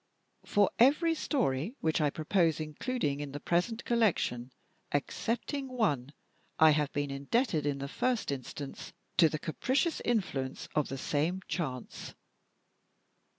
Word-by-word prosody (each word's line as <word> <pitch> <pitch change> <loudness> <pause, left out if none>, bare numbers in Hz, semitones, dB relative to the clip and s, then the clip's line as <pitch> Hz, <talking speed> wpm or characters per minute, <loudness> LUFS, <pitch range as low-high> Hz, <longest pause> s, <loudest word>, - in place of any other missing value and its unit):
For 205 -1 +3
every 300 +7 +5
story 215 - -1
which 160 0 +1
I 150 - +3
propose 165 +1 +1
including 155 - -2
in 145 -2 -5
the 145 - -4
present 180 +9 0
collection, 175 - +1 0.4
excepting 240 - -2
one, 175 - 0 0.5
I 160 -1 +7
have 150 -1 +1
been 145 -1 -2
indebted, 150 - 0
in 140 -1 0
the 140 0 -4
first 245 - 0
instance, 140 +1 -6 0.2
to 165 -3 +7
the 155 - -2
capricious 260 - 0
influence 160 - -1
of 150 - +1
the 135 - -4
same 155 +7 0
chance. 135 -8 -4
160 Hz, 130 wpm, -31 LUFS, 140-235 Hz, 0.5 s, I